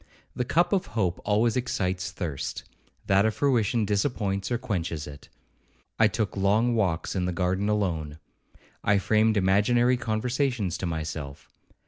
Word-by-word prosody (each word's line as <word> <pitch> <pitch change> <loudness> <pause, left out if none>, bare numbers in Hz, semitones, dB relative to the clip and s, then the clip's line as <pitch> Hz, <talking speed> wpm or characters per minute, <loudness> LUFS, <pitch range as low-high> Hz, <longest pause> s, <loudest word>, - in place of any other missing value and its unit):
The 125 - -1
cup 175 +8 +2
of 190 - +1
hope 90 -5 0
always 110 +2 +2
excites 95 -7 -1
thirst, 80 -7 -4 0.4
that 95 +1 +4
of 110 -1 +1
fruition 120 -5 +2
disappoints 100 -2 -1
or 120 - +2
quenches 85 -9 -3
it. 70 -1 -11 0.7
I 115 - +6
took 105 0 -2
long 105 +5 +2
walks 90 -7 0
in 90 -2 0
the 90 - -1
garden 95 +3 0
alone. 85 -8 -1 0.7
I 100 - +3
framed 110 +2 +2
imaginary 110 +6 +3
conversations 120 - -1
to 95 - -2
myself. 80 -3 -5
100 Hz, 140 wpm, -26 LUFS, 90-115 Hz, 0.7 s, I